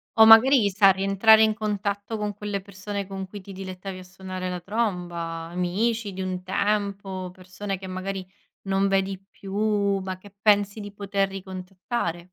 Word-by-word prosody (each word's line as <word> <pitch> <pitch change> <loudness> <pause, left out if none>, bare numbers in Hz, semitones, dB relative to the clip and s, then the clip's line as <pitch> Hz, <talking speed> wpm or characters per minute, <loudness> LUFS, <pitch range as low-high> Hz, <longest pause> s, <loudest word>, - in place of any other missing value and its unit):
O 220 - +8
magari, 225 0 +8
sai, 195 0 +6
rientrare 195 +3 +5
in 220 0 +3
contatto 210 0 -2
con 210 -1 -2
quelle 205 -1 -4
persone 200 +1 -5
con 190 0 -6
cui 205 +2 -9
ti 195 +1 -11
dilettavi 185 0 -7
a 185 - -10
suonare 185 0 -6
la 180 -1 -3
tromba, 180 -3 -2 0.3
amici 200 +5 -1
di 190 0 -6
un 185 -1 -3
tempo, 195 -1 -1
persone 185 +2 -6
che 190 - -10
magari 185 +1 -4 0.4
non 195 0 +1
vedi 195 0 0
più, 200 0 0
ma 185 -1 -5
che 200 +1 -16
pensi 205 0 +3
di 205 0 -7
poter 200 -1 -1
ricontattare. 185 -1 -4
195 Hz, 160 wpm, -25 LUFS, 185-205 Hz, 0.4 s, O